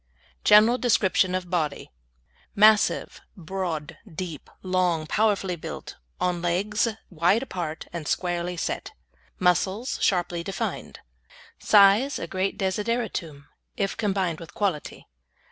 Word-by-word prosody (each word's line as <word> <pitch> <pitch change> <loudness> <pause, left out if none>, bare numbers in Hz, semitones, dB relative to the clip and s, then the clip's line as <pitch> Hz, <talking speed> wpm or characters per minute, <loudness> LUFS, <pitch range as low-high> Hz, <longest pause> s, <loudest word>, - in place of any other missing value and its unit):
GENERAL 220 +4 +6
DESCRIPTION 190 -6 +2
OF 180 -1 -4
BODY 155 -5 -2 0.6
Massive, 210 0 +4 0.2
broad, 170 -3 -4
deep, 160 -2 -6
long, 180 -4 +1
powerfully 200 -1 +1
built, 165 - -8 0.2
on 180 -1 0
legs 195 +6 0 0.2
wide 180 +8 +2
apart, 170 -10 -5
and 165 -3 -5
squarely 175 0 -1
set. - - -3 0.4
Muscles 190 +6 +1
sharply 175 -2 +1
defined. 195 +1 -5 0.6
Size 210 +7 +5
a - - -4
great 190 +1 -2
desideratum, 190 -7 -2 0.3
if 195 -1 -1
combined 190 -6 -1
with 165 - -12
quality. 190 -8 -2
185 Hz, 110 wpm, -25 LUFS, 170-205 Hz, 0.6 s, GENERAL